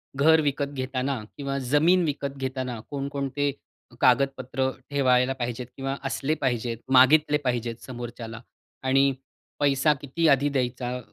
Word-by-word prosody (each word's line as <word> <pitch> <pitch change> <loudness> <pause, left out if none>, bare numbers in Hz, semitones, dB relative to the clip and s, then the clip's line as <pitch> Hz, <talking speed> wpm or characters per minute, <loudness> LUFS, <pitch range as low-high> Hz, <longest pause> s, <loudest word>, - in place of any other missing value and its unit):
घर 160 +3 +5
विकत 145 -1 -1
घेताना 130 0 -2 0.2
किंवा 140 -1 -3
जमीन 170 +6 +4
विकत 140 -2 -3
घेताना 130 -3 -3
कोण-कोणते 140 0 -2 0.5
कागदपत्र 130 0 +2 0.2
ठेवायला 130 -2 +3
पाहिजेत? 120 0 -3
किंवा 135 0 -2
असले 140 +3 -1
पाहिजेत? 120 -3 -1
मागितले 145 +3 +6
पाहिजेत 120 -2 -1
समोरच्याला? 120 -2 -7 0.4
आणि 135 +1 +3 0.5
पैसा 140 +1 +3
किती 160 +4 0
आधी 140 0 +4
द्यायचा? 125 -2 -2
135 Hz, 120 wpm, -26 LUFS, 125-140 Hz, 0.5 s, मागितले